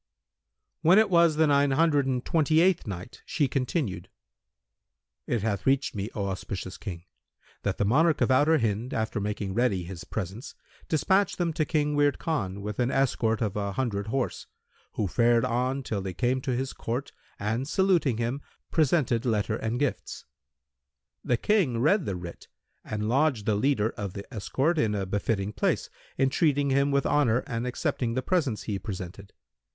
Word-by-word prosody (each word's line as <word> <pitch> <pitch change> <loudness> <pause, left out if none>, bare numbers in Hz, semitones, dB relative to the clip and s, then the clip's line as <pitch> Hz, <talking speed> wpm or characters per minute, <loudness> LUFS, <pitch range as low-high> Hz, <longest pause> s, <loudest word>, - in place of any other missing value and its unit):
When 170 +4 +6
it 215 -2 +4
was 170 -2 +5
the 160 +1 +4
Nine 145 -1 +3
Hundred 145 -1 +3
and 130 -2 -1
Twenty 155 -1 +3
eighth 175 -5 +3
Night, 95 +3 -7
She 145 -4 0
continued: 125 - -2 1.2
It 115 -4 -1
hath 105 -1 -2
reached 135 +1 +2
me, 100 +1 -3
O 100 -3 -1
auspicious 95 0 -5
King, 85 -5 -6 0.6
that 100 -2 -2
the 105 - +1
monarch 150 +8 +3
of - - +2
Outer 145 +5 +4
Hind, 115 0 -1
after 110 0 -1
making 100 -1 -3
ready 105 -5 +1
his 85 0 -8
presents, 100 +4 -6 0.3
despatched 190 +5 +2
them 170 -2 0
to 155 -1 0
King 150 -1 0
Wird 145 0 +3
Khan 100 - -3
with 105 0 -5
an 125 0 +2
escort 120 -4 +1
of 105 -3 -2
an 100 -1 -2
hundred 105 -6 -2
horse, 130 +3 -2 0.5
who 105 - -1
fared 120 +4 +3
on 130 +3 -1
till 105 -5 -3
they 95 -2 -5
came 130 +3 0
to 130 -1 -1
his 130 +2 -3
court 125 +5 -4 0.3
and 115 +6 -2
saluting 170 - +2
him, 120 +4 -2 0.3
presented 140 -7 +2
letter 110 -3 0
and 115 +2 -2
gifts. 145 -2 -3 1.0
The 120 - +1
King 180 - +2
read 170 - +3
the 100 - -1
writ 85 -1 -9 0.4
and 105 0 -3
lodged 130 -3 +2
the 110 - +2
leader 110 0 +1
of 100 -3 -6
the 100 - -7
escort 135 - 0
in 105 -4 +1
a 100 -1 -1
befitting 100 +1 -1
place, - - 0 0.3
entreating 140 +1 +2
him 140 +1 +3
with 140 -1 +1
honour 125 -5 +2
and 120 -1 -3
accepting 120 -1 -2
the 130 - -1
presents 145 - 0
he 100 -3 -3
presented. 95 -1 -7
125 Hz, 170 wpm, -27 LUFS, 105-145 Hz, 1.2 s, When